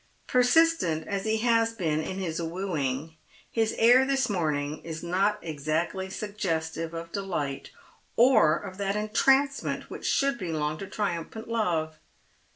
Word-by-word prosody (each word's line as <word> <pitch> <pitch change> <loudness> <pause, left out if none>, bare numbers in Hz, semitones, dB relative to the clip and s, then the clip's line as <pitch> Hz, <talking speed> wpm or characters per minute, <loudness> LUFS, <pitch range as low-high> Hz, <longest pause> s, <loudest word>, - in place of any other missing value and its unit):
Persistent 250 - +3
as 200 0 -2
he 220 0 +1
has 230 -1 +3
been 160 -8 -1
in 185 +4 -5
his 170 -3 -3
wooing, 160 -4 -3 0.3
his 225 -1 0
air 245 +3 +6
this 270 -3 +1
morning 150 -5 -1
is 160 -1 -6
not 195 +4 +1
exactly 160 +5 -2
suggestive 165 -6 -3
of 165 0 -6
delight, 170 -9 -3 0.5
or 235 -11 +5
of 190 +1 -9
that 200 0 -1
entrancement 265 +6 +1
which - - -5
should 275 -3 +1
belong 155 -4 -2
to 195 - -6
triumphant 205 +2 -4
love. 165 -9 -1
190 Hz, 135 wpm, -27 LUFS, 160-225 Hz, 0.5 s, air